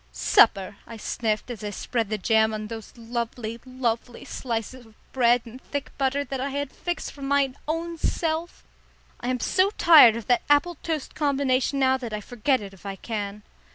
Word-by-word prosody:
"Supper," 195 -1 +4
I 230 - -8
sniffed, 220 +1 -2
as 220 -4 -7
I 210 - -2
spread 225 +1 -2
the 215 - -1
jam 220 +2 +2
on 215 0 -4
those 225 -1 -8
lovely, 235 -1 -4
lovely 245 -2 -3
slices 240 +1 -4
of 220 - -21 0.2
bread 245 -2 +4
and 240 +3 -11
thick 285 -1 -5
butter 275 +1 +1
that 270 -2 -5
I 275 - -1
had 285 0 -3
fixed 350 -1 -4
for 285 - -14
my 275 -1 +1
own 330 +1 -3
self. 325 +2 -2 0.6
"I 245 - -5
am 250 0 0
so 375 +10 +2
tired 300 -10 +8
of 230 -2 -5
that 245 - +3
apple 290 +3 +3
toast 315 -4 -3
combination 275 -2 +1
now 265 -1 +3
that 240 -4 -6
I 210 - -2
forget 245 +4 0
it 200 -1 -8
if 190 - -17
I 195 -1 -5
can." 210 -1 -5
245 Hz, 190 wpm, -25 LUFS, 220-280 Hz, 0.6 s, tired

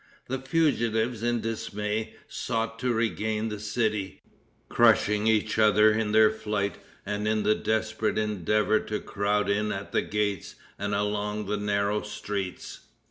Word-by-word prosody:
The 130 +1 -2
fugitives, 120 -6 +1
in 120 0 0
dismay, 110 -1 -3
sought 115 0 -3
to 125 0 0
regain 110 -1 -1
the 105 -1 -5
city, 105 -2 -2 0.4
crushing 105 +1 +3
each 110 0 +2
other 105 0 +6
in 110 -1 0
their 110 0 +6
flight 105 -2 -2 0.3
and 105 +1 -2
in 110 0 +1
the 105 - +4
desperate 110 0 -1
endeavor 105 +1 +1
to 105 - -4
crowd 105 0 0
in 105 +1 +1
at 100 +1 -5
the - - +2
gates 105 -3 -2 0.2
and 100 0 -1
along 105 +1 -1
the 105 +2 -1
narrow 105 0 0
streets. 105 -3 -5
105 Hz, 140 wpm, -27 LUFS, 105-110 Hz, 0.4 s, other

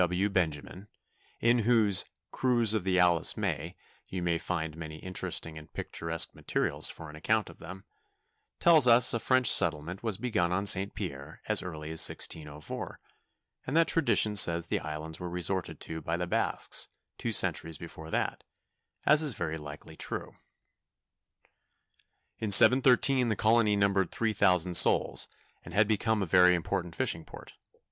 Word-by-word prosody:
G. - - +5
W. 90 +3 -1
Benjamin, 90 +2 -3 0.5
in 120 +1 +3
whose 110 -4 +1 0.3
"Cruise 120 -4 +1
of 110 -4 -1
the 95 -1 0
Alice 90 -2 +2
May" - - -4 0.3
you 90 -2 -5
may 85 -1 -1
find 80 -3 -4
many 80 -1 -8
interesting 80 -3 -4
and 75 - -17
picturesque 80 -1 -3
materials - - -1
for 80 - -9
an 75 - -12
account 110 +4 -1
of - - -20
them, 95 +4 -11 0.7
tells 160 -6 +5
us 120 +1 +6
a 115 - -1
French 130 +1 +3
settlement 80 +5 +1
was 110 -5 -3
begun 105 -7 -1
on 95 +3 -1
St. 100 0 +4
Pierre 75 -5 -8
as - - +2
early 80 -3 -8
as 80 - -2
1604, 75 -1 -3 0.7
and 140 +5 -1
that 165 - +3
tradition 110 -9 +2
says 85 -4 +4
the - - -2
islands 75 +1 -7
were 90 - -6
resorted 90 +1 -4
to 80 0 -6
by 80 +3 -3
the 90 - -3
Basques 85 - -1 0.3
two - - -3
centuries 80 -1 0
before 80 -1 -11
that, - - -3 0.6
as 150 +1 +6
is 145 -8 +1
very 80 -2 -4
likely 75 +2 -11
true. - - -6 2.1
In 110 - -3
1713 130 +3 +6
the 110 - 0
colony 110 0 +2
numbered 100 -3 +1
three 115 -1 -2
thousand 90 -2 +1
souls, - - +3 0.4
and 85 - -11
had 105 +1 +3
become 110 0 0
a - - -2
very 90 +1 +4
important 85 0 -4
fishing 80 - -2
port. - - -14
90 Hz, 160 wpm, -28 LUFS, 80-110 Hz, 2.1 s, us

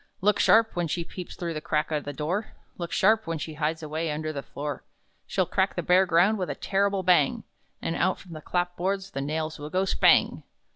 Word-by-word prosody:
"Look 205 +1 +2
sharp 225 0 +4
when 175 -1 0
she 170 +2 -2
peeps 180 +1 -8
through 170 -2 -4
the 155 - -4
crack 155 0 -1
o' 150 - +1
the 145 0 -6
door! 165 +9 -3 0.2
Look 170 -1 -5
sharp 220 +1 +3
when 165 0 -2
she 155 +1 -5
hides 155 +1 -2
away 155 +2 -2
under 155 +1 -3
the 140 - -4
floor! 145 +1 -6 0.4
She'll - - +1
crack - - 0
the - - -2
bare 185 +1 +4
ground 180 +6 +3
with 180 - -2
a - - -3
terrible 195 0 0
bang! 175 -6 +3 0.4
And 165 - -1
out 185 +2 +1
from 180 -3 -12
the 155 - -8
clap 180 +2 -1
boards 195 +2 -2
the 135 - -3
nails 155 +2 -3
will 150 +1 -6
go, 185 +3 +1
spang! - - +4
170 Hz, 225 wpm, -26 LUFS, 155-190 Hz, 0.4 s, sharp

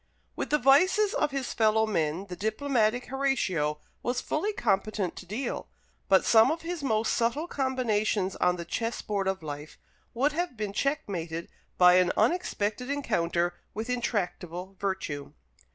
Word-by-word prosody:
With - - -3
the 300 - +4
vices 370 - +4
of 300 -12 +1
his 275 -2 -3
fellow 220 0 +3
men 165 -3 -1
the 180 -2 -7
diplomatic 220 +2 0
Horatio 190 - 0 0.2
was 245 +1 -1
fully 365 +11 -1
competent 205 - 0
to 180 - -9
deal; 235 +7 -3 0.4
but 190 - +5
some 225 -1 +6
of 325 +1 -2
his 340 -1 -4
most 220 -5 +1
subtle 240 +7 0
combinations 220 - 0
on 180 0 +2
the 170 -1 -6
chess 230 +6 -3
board 200 -2 -1
of 190 -3 -1
life 150 0 -7 0.4
would 275 +5 +2
have 335 -4 -3
been 210 -2 -3
checkmated 185 - -2 0.3
by 180 0 +7
an 180 -1 +4
unexpected 250 - 0
encounter 175 -11 0 0.2
with 225 +4 -3
intractable 190 -6 -3
virtue. 190 -8 -3
215 Hz, 150 wpm, -28 LUFS, 185-270 Hz, 0.4 s, by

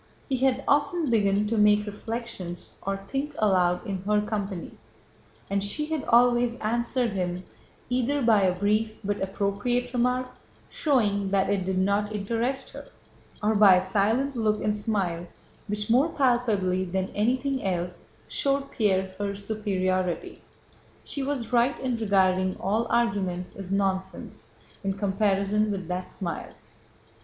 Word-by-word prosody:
He 265 - +1
had 265 +1 +1
often 295 0 +2
begun 205 -2 +3
to 220 +1 0
make 210 0 +5
reflections 205 -4 -6
or 195 0 -2
think 280 +2 -3
aloud 185 -2 +2
in 195 -4 -3
her 210 +2 +2
company, 205 -3 -3 0.8
and 200 0 0
she 295 +9 -1
had 310 - -1
always 240 0 +4
answered 235 +2 0
him 180 -2 -2 0.4
either 255 +3 0
by 220 -3 +5
a 180 -1 +2
brief 215 +3 +1
but 205 +1 -2
appropriate 205 +6 -1
remark—showing 250 -3 -1
that 195 0 +2
it 195 -2 0
did 190 0 -1
not 200 +2 +1
interest 230 +6 -2
her—or 215 +1 -6
by 205 -3 +7
a - - +4
silent 215 +9 0
look 215 -2 0
and 210 0 +1
smile 195 -6 -1 0.4
which 210 0 -2
more 265 +7 +4
palpably 225 - +1
than 190 +1 -2
anything 255 +5 0
else 180 -2 -3 0.2
showed 275 0 0
Pierre 190 -3 +1
her 200 -1 -2
superiority. 185 -4 -2 0.6
She 280 - -2
was 265 -4 -3
right 245 +3 +3
in 255 -2 -1
regarding 185 -3 +2
all 220 +5 0
arguments 195 -6 0
as 195 -1 -6
nonsense 190 -1 -2 0.4
in 195 0 0
comparison 200 +1 +1
with 190 -4 -3
that 180 0 -3
smile. 175 -3 -5
210 Hz, 135 wpm, -26 LUFS, 190-240 Hz, 0.8 s, by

